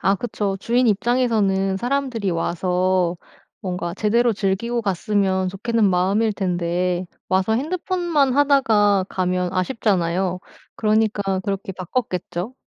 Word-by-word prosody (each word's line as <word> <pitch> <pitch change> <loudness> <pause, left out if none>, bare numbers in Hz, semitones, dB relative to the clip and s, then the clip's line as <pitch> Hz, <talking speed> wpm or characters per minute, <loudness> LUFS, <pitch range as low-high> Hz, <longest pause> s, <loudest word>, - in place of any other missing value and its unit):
아 195 - +3
그쵸. 200 -2 -3
주인 245 +3 +2
입장에서는 205 -3 +1
사람들이 245 -4 -1
와서 180 +1 0 0.4
뭔가 180 -3 -4
제대로 230 +4 +2
즐기고 215 +5 -1
갔으면 190 -1 0
좋겠는 215 +3 +1
마음일 195 +5 +2
텐데 180 -1 -1 0.2
와서 190 +3 +2
핸드폰만 330 - 0
하다가 225 -9 +3
가면 180 -1 -1
아쉽잖아요. 185 -3 0 0.4
그러니까 210 -3 +1
그렇게 195 0 -4
바꿨겠죠. 185 +1 -4
195 Hz, 295 characters per minute, -21 LUFS, 185-230 Hz, 0.4 s, 아